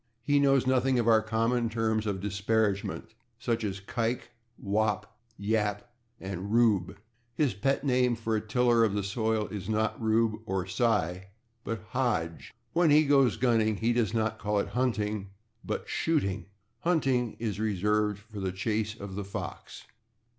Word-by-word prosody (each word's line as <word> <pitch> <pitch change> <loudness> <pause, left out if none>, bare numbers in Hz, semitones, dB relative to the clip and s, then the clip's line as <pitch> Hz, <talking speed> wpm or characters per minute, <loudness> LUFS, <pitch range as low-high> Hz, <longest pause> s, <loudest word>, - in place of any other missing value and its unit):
He 145 +2 +3
knows 135 -2 +4
nothing 130 0 +2
of 120 -1 +1
our 110 -1 +6
common 115 +2 0
terms 110 -1 0
of 95 -2 -2
disparagement, 105 +1 -1 0.2
such 115 -1 -1
as 100 -2 -3
/kike/, 115 +3 -2 0.4
/wop/, 105 +1 0 0.4
/yap/ 105 0 0 0.4
and 95 +1 -5
/rube/. 110 -6 +3 0.4
His 140 -2 +2
pet 135 +9 0
name 125 -3 +2
for 115 -1 -2
a 105 - 0
tiller 120 +2 +3
of 105 -3 +1
the 100 - 0
soil 110 +1 0
is 100 -2 -6
not 110 +1 0
/Rube/ 110 0 +1
or 95 -1 -1
/Cy/, 95 -4 0 0.4
but 110 -2 -5
/Hodge/. 105 -11 -1 0.3
When 170 -1 +4
he 150 +1 +6
goes 135 -5 +4
gunning 110 -3 +2
he 115 +3 +1
does 115 -4 +1
not 110 -1 -1
call 105 0 -1
it 100 - 0
/hunting/, 105 -5 -1 0.4
but - - -3
/shooting/; 135 - 0 0.4
/hunting/ 135 -9 +1
is 105 -4 -3
reserved 105 0 +1
for 105 0 -10
the 95 -1 -1
chase 105 +3 -2
of 100 -1 -7
the 100 +1 -4
fox. 100 - -7
110 Hz, 155 wpm, -29 LUFS, 105-120 Hz, 0.4 s, our